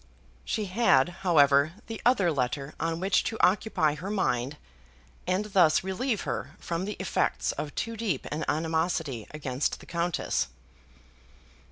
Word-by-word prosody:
She 215 -2 -2
had, 185 - +3
however, 145 -4 +4
the 225 -1 -7
other 205 -9 +4
letter 135 +1 -2
on 165 0 -1
which 190 +1 +2
to 225 - -2
occupy 180 -5 +3
her 165 +6 -6
mind, 145 - 0 0.7
and 185 +3 +1
thus 185 -7 +4
relieve 210 +4 -1
her - - -4
from 170 +2 -3
the 210 0 -5
effects 190 - 0
of 150 -1 -5
too 230 0 -3
deep 205 - -2
an 150 +2 -2
animosity 160 - -1
against 140 -2 -2
the - - -13
Countess. 170 - -1
170 Hz, 140 wpm, -28 LUFS, 145-195 Hz, 0.7 s, however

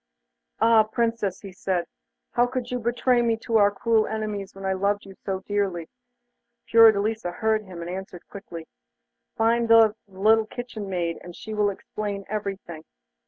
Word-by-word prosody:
'Ah, 225 -1 +6
Princess!' 220 -3 -1
he 195 - -9
said, 185 -2 -2 0.5
'how 240 0 +3
could 250 -1 -4
you 250 - -1
betray 240 +1 +2
me 230 -1 +1
to 225 0 0
our 205 -1 +6
cruel 220 +2 +1
enemies 210 -3 -4
when 195 0 -8
I 190 - +1
loved 200 +2 0
you 195 - -11
so 190 0 -5
dearly?' 195 -5 -2 0.7
Fiordelisa 220 -3 +4
heard 220 +2 0
him, 180 -3 -9
and 170 - -6
answered 185 -1 -8
quickly: 170 -5 -9 0.7
'Find 230 +1 +2
out 225 -2 +7
the 190 -1 -15
little 220 +2 +4
kitchen 230 -5 -7
maid, 170 -3 -2
and 175 -1 -10
she 220 - -8
will 210 -1 +2
explain 200 0 -5
everything. 195 -6 -5
205 Hz, 165 wpm, -25 LUFS, 190-225 Hz, 0.7 s, out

